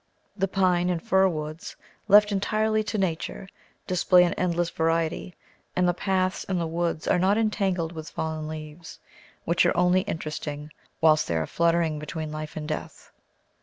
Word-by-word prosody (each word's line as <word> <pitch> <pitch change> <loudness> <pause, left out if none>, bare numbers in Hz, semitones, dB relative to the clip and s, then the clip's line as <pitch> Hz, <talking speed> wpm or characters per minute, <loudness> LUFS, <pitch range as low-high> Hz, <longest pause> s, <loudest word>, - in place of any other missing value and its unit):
The 195 -1 0
pine 180 -2 +2
and 175 -2 0
fir 190 +3 +3
woods, 155 -2 -5 0.3
left 210 +1 +6
entirely 215 +2 +1
to 210 +1 -2
Nature, 190 0 -2 0.4
display 180 0 +4
an 175 - +1
endless 175 -1 -1
variety; 165 +2 -1 0.4
and 180 0 +2
the 175 - +3
paths 185 +1 -1
in 190 - -2
the 170 - -1
woods 165 -1 -2
are 180 - +3
not 195 +3 +3
entangled 195 -6 0
with 160 -2 -8
fallen 160 -1 -4
leaves, 155 +1 -8 0.5
which 170 +2 +3
are 175 - +2
only 180 +1 +4
interesting 155 -4 -5 0.3
whilst 155 -1 +4
they 85 - -1
are 80 -1 0
fluttering 165 - +1
between 155 +1 -5
life 155 0 -6
and 150 -1 -5
death. 155 - -6
170 Hz, 165 wpm, -26 LUFS, 155-185 Hz, 0.5 s, left